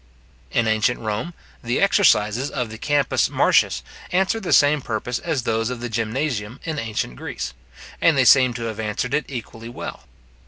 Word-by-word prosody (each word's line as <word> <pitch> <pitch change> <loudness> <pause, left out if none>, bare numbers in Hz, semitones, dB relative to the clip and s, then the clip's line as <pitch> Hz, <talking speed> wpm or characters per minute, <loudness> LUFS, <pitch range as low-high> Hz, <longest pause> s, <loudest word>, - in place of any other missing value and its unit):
In 115 -1 +1
ancient 110 +2 +1
Rome, 110 +11 -3 0.3
the 120 +1 0
exercises 135 - +3
of 125 -5 -3
the 110 - -9
Campus 145 -1 +1
Martius - - +2 0.3
answered 190 +5 +1
the 185 - -4
same 145 0 +5
purpose 120 +1 -3
as 155 -7 -2
those 115 0 0
of 125 -1 -4
the 120 0 -4
Gymnasium 115 0 -2
in 155 -2 -3
ancient 110 - -3
Greece, 70 +2 -5 0.5
and 165 -4 +4
they 130 - +4
seem 130 -1 +6
to 120 - -4
have 110 -2 -4
answered 110 +3 -2
it 150 - +1
equally 115 -3 -7
well. 120 - -8
120 Hz, 170 wpm, -22 LUFS, 110-145 Hz, 0.5 s, seem